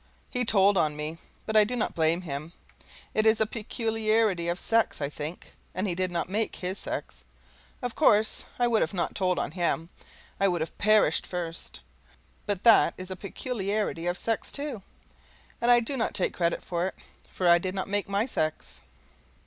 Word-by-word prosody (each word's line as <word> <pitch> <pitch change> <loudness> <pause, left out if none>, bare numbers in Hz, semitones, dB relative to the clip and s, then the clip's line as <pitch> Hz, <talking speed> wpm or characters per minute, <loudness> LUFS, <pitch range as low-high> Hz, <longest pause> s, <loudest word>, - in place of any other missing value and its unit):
He 250 0 0
told 200 -2 +4
on 150 -2 +1
me, 155 +2 -5 0.3
but 220 - -3
I 215 - +8
do 235 +4 -3
not 230 - -1
blame 165 +2 +2
him; 155 0 -6 0.6
it 215 0 +3
is 220 0 +5
a 220 - +4
peculiarity 220 -4 0
of 175 +1 0
sex, 230 -6 +2
I 140 -2 -2
think, 150 +3 -7 0.2
and 185 +3 -1
he 180 - 0
did 185 +1 -1
not 170 -1 -2
make 210 +4 -1
his 185 +2 -3
sex. - - -5 0.6
Of 245 -2 -2
course 215 -7 +3
I 245 - +3
would 230 -2 +3 0.2
not 175 - 0
have - - -20
told 185 -2 +1
on - - -2
him, 170 -1 -1 0.5
I 195 - +5
would 175 -3 0
have 160 - -4
perished 215 +1 +4
first; 170 -2 -4 0.7
but 205 -2 -1
that 230 -2 +6
is 185 0 -7
a - - -3
peculiarity 200 -3 -3
of 175 +1 0
sex, 225 -1 -1
too, 280 -7 -2 0.8
and 235 - +2
I 240 0 +8
do 240 +4 -2
not 235 - -1
take 185 - +1
credit 170 -1 0
for 175 0 -1
it, - - -6 0.3
for 185 - -1
I 170 0 +7
did 185 +2 -4
not 190 - -2
make 205 0 -1
my 200 +3 +1
sex. 155 -11 -3
195 Hz, 190 wpm, -27 LUFS, 175-220 Hz, 0.8 s, I